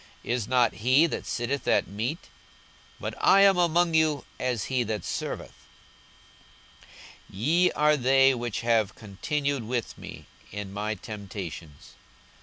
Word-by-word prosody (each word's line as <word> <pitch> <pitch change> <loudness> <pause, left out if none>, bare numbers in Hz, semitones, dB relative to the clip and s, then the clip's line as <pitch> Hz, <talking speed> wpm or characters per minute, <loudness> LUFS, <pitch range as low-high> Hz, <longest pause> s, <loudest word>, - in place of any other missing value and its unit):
is 120 -3 -2
not 125 -3 +3
he 130 +7 +5
that 165 - -4
sitteth 125 +4 -2
at - - +3
meat? 115 - -4 0.7
but - - -4
I 195 - +6
am 195 -2 +5
among 175 0 +2
you 155 -3 +2
as 125 -5 -1
he 130 +2 0
that 110 -5 -3
serveth. - - -4 1.7
42:022:028 - - -27
Ye 165 - +3
are 150 0 +3
they 135 +1 +4
which 120 -3 -3
have 115 -3 +1
continued 140 +7 -2
with 120 -1 -3
me - - -10 0.3
in 100 -1 -6
my 105 +2 -2
temptations. 95 -7 -8
125 Hz, 135 wpm, -27 LUFS, 105-150 Hz, 1.7 s, I